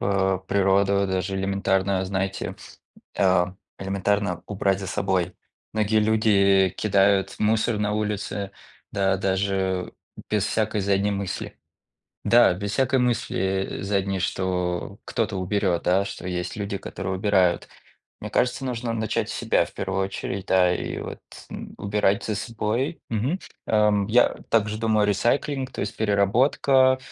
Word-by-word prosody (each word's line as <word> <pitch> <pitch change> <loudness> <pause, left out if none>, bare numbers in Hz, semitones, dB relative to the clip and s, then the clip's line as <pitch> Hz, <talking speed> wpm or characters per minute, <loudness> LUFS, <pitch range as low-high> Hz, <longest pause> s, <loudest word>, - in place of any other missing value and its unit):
п 95 -1 +1
природу, 100 0 +3
даже 95 +1 -2
элементарно, 95 0 0
знаете, 95 0 -3 0.6
а, 90 -1 +2 0.2
элементарно 100 -1 -1
убрать 100 -1 0
за 95 - -5
собой. 95 -2 -1 0.4
Многие 110 0 +2
люди 100 -3 +4
кидают 100 -1 +2
мусор 110 +1 +1
на 105 0 0
улице, 105 -1 -2 0.4
да 95 -1 +2
даже 95 -1 -1 0.4
без 105 -2 +1
всякой 110 -1 0
задней 100 +1 +1
мысли. 100 -2 -4 0.7
Да, 120 -5 +6
без 100 +2 -4
всякой 135 +1 +2
мысли, 125 -2 0 0.4
э, - - -6
задней, 100 -1 0
что 90 +2 -2
кто-то 110 -3 -2
уберет, 95 -2 0
да, 95 +2 +3
что 100 - -7
есть 90 +1 -3
люди, 100 -1 -3
которые 95 +1 -5
убирают. 95 -2 +2 0.5
Мне - - -6
кажется, 125 +2 0
нужно 120 -2 -2
начать 110 -1 -1
с - - -4
себя - - +1
в - - -15
первую 95 - -2
очередь, 95 0 -5
да, 90 -1 +4
и - - -4
вот - - -7 0.3
н - - -8
убирать 100 0 +1
за 110 - -1
собой. 115 - -2
Мгм, 125 - 0 0.3
эм, 105 -2 +3
я 120 +4 +4 0.2
также 105 -1 +1
думаю, 110 -2 +2
recycling, 130 +6 +1
то - - -6
есть 100 - -5
переработка, 130 +6 +3
100 Hz, 135 wpm, -24 LUFS, 95-110 Hz, 0.7 s, Да